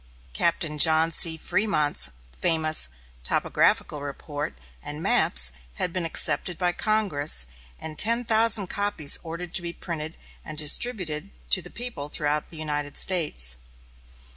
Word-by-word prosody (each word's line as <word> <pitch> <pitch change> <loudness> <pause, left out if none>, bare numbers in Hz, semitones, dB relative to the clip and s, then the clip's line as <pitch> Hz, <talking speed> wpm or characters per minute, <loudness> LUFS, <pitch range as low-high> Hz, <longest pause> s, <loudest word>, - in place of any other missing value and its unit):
Captain 160 - 0
John 160 +1 +4
C. 160 0 +5
Frémont's 155 -4 +1 0.3
famous 155 - +3 0.3
topographical 145 - 0
report 145 - -6 0.3
and - - -5
maps - - +2 0.2
had 175 - -2
been 180 -2 -3
accepted 170 +1 +1
by 180 -1 0
Congress, 175 - +2 0.3
and 155 -1 -8
ten 235 +2 +2
thousand 225 -2 +3
copies 200 -6 -1
ordered 170 +1 -8
to 190 - +3
be 170 0 -5
printed 160 -2 -7 0.3
and 155 - -10
distributed 155 0 +1 0.2
to - - +4
the - - -12
people 230 -13 -5
throughout 150 0 -2
the 165 - -12
United 150 -2 -4
States. 65 - +4
160 Hz, 130 wpm, -24 LUFS, 150-180 Hz, 0.3 s, C